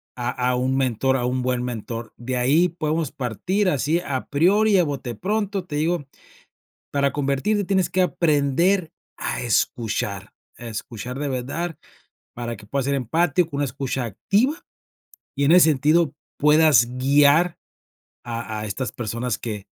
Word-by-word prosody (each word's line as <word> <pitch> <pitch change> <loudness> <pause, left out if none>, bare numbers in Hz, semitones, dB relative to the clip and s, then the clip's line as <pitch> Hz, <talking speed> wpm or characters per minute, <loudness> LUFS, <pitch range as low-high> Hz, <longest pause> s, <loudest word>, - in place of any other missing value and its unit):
a 120 -1 -2 0.2
a 125 - +1
un 130 +1 0
mentor, 130 0 +1
a 120 - -2
un 125 +1 -1
buen 125 -1 -1
mentor, 115 -1 -5
de 125 +2 -4
ahí 145 +8 +3
podemos 155 -2 -2
partir 160 - -1
así 155 +2 +1
a 135 -6 -4
priori, 195 +7 +4
a 180 - +5
bote 135 -6 -4
pronto, 200 - -2
te 150 -4 -4
digo, 160 -1 0 0.9
para 140 -1 +1
convertirte 145 +9 0
tienes 190 -1 +2
que 185 - +1
aprender 170 +2 +2 0.2
a - - -3
escuchar, 110 -3 -1 0.2
a 120 - -10
escuchar 115 +3 -6
de 145 - -2
verdad, 140 +7 -3 0.6
para 120 -1 -5
que 105 - -14
puedas 135 +4 -2
ser 140 0 +1
empático, 160 +6 +1
una 145 - +1
escucha 130 -1 -3
activa 210 - 0 0.7
y 140 - +2
en 160 - +5
ese 175 -3 +7
sentido 150 +2 +2 0.2
puedas 150 -3 +5
guiar 145 +6 +4 0.7
a 115 -2 -4
a 105 - -4
estas 120 +5 -4
personas 120 +1 -3
que 105 -4 -6
140 Hz, 150 wpm, -23 LUFS, 125-170 Hz, 0.9 s, ese